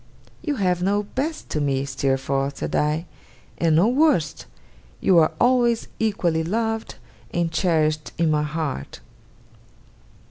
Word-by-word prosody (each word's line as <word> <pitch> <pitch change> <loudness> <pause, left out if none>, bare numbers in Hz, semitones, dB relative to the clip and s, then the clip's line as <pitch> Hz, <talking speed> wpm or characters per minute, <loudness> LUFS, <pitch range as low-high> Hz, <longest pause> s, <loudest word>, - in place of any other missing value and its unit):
'You 300 -3 -2
have 180 -5 0
no 200 +3 +1
best 285 +9 -4
to 150 - -1
me, 140 -1 0
Steerforth,' 135 +1 -1
said - - -3
I, 150 +3 +1 0.5
'and 165 -2 +3
no 175 +7 +5
worst. 255 - +2 0.5
You 180 -3 +5
are 155 - +4
always 240 -2 +2
equally 175 -7 +1
loved, 225 +5 -2 0.4
and 170 -1 0
cherished 155 -3 +1
in 165 -2 +2
my 150 -1 +2
heart. 150 - -4
165 Hz, 130 wpm, -23 LUFS, 150-220 Hz, 0.5 s, no